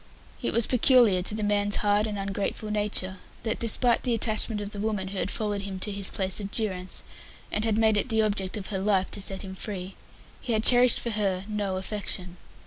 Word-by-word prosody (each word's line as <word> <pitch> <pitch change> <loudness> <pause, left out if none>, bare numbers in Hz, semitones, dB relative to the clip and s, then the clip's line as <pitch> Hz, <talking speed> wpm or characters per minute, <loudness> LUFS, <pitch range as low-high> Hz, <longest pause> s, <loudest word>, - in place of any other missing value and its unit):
It - - -1
was 230 -1 +3
peculiar 245 -6 +5
to 200 +4 -2
the 215 - -3
man's 205 0 +2
hard 210 +1 +2
and 210 -1 -4
ungrateful 200 +2 -3
nature 205 -3 0 0.3
that, 225 - -2
despite 235 +1 +3
the 240 -2 0
attachment 220 -1 +2
of 205 0 -6
the 205 - -7
woman 205 -3 -2
who 195 -1 -4
had - - -1
followed 205 -2 -2
him 195 -1 -5
to 205 +3 -3
his 200 -1 -2
place 190 0 -2
of 200 -1 -5
durance, 190 -4 -2 0.5
and 210 - -1
had 220 -1 +1
made 220 -1 +3
it 230 - -1
the 220 -1 +2
object 200 -2 -1
of 195 - -6
her 190 - -1
life 195 -1 +1
to 205 - -3
set 190 0 -2
him 190 -1 -7
free, 190 -1 -6 0.5
he 240 - -2
had 215 0 +1
cherished 245 0 +6
for 235 - -3
her 195 -3 -1
no 205 -3 -2
affection. 190 -2 -3
205 Hz, 220 wpm, -27 LUFS, 195-220 Hz, 0.5 s, cherished